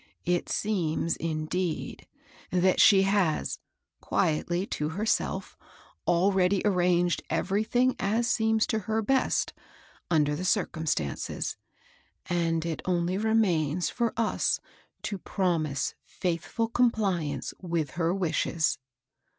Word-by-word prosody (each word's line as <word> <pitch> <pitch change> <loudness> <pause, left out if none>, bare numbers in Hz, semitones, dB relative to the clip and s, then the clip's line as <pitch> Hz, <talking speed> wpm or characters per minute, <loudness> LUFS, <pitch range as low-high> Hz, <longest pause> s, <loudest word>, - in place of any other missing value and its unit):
It 175 0 0
seems, 170 -6 0
indeed, 165 +1 -3 0.4
that 185 +1 +3
she 200 -3 +7
has, 195 -5 +1 0.4
quietly 175 +4 0
to 150 -6 -2
herself^ 205 +7 -1 0.5
already 185 +2 +3
arranged 175 -3 +2
everything 225 +6 +1
aS 225 +4 +1
seems 220 -2 +2
to 220 - 0
her 220 0 +1
best, 265 +4 +1 0.6
under 150 -3 +2
the 170 - -4
circumstances; 160 - -1 0.7
and 165 -2 0
it 165 -2 -3
only 180 +1 0
remains 180 -8 +1
for 235 -2 0
us 225 -1 +1 0.4
to 200 - -3
promise 165 -9 -1 0.3
fiiithful 185 +6 -1
compliance 190 - +1
with 170 -6 -2
her 165 +2 0
wishes. 165 -4 0
180 Hz, 100 wpm, -28 LUFS, 165-205 Hz, 0.7 s, she